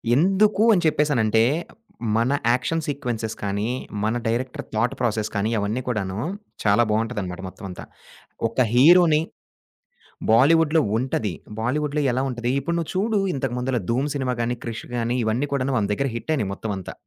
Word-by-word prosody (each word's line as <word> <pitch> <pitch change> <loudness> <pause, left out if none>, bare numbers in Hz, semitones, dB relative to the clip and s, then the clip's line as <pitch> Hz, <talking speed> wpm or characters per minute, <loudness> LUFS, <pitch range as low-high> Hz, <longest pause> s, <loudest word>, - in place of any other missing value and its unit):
ఎందుకు 195 +6 +3
అని 180 - +3
చెప్పేసనంటే 120 -8 +2 0.8
మన 120 +4 +2 0.2
యాక్షన్ 160 +6 0
సీక్వెన్సె‌స్ 120 -6 -3
కానీ 100 +1 -1 0.4
మన 110 +2 +1
డైరెక్టర్ 125 +3 -2
థాట్‌ 115 +3 +1
ప్రాసెస్ 110 -3 0
కానీ 105 +2 0
అవన్నీ 105 +5 -1
కూడాను 100 -4 -2 0.4
చాలా 105 +2 +4
బాగుంటదనమాట 105 -5 -2
మొత్తమంతా. 95 -1 -8 0.7
ఒక 115 +3 -2
హీరో‌ని 155 +4 +6 1.1
బాలీవుడ్‌లో 155 +6 +5 0.2
ఉంటది. 115 -5 -1 0.3
బాలీవుడ్‌లో 145 +5 0
ఎలా 130 +2 0
ఉంటది 120 0 -2
ఇప్పుడు 170 +5 -2
నువ్వు 165 - -3
చూడు 210 +2 +1
ఇంతకు 135 -3 -2
ముందుల 125 0 -1
'ధూమ్; 135 +5 0
సినిమా 130 -3 -1
గానీ, 120 +1 -1
'క్రిష్' 115 -1 -5
గానీ 120 +1 0
ఇవన్నీ 115 +6 0
కూడాను 135 -1 0
మన 100 - -1
దగ్గర 140 +4 -1
హిట్టయినియి 125 -6 -1
మొత్తమంతా. 95 -3 -5
125 Hz, 140 wpm, -23 LUFS, 110-145 Hz, 1.1 s, హీరో‌ని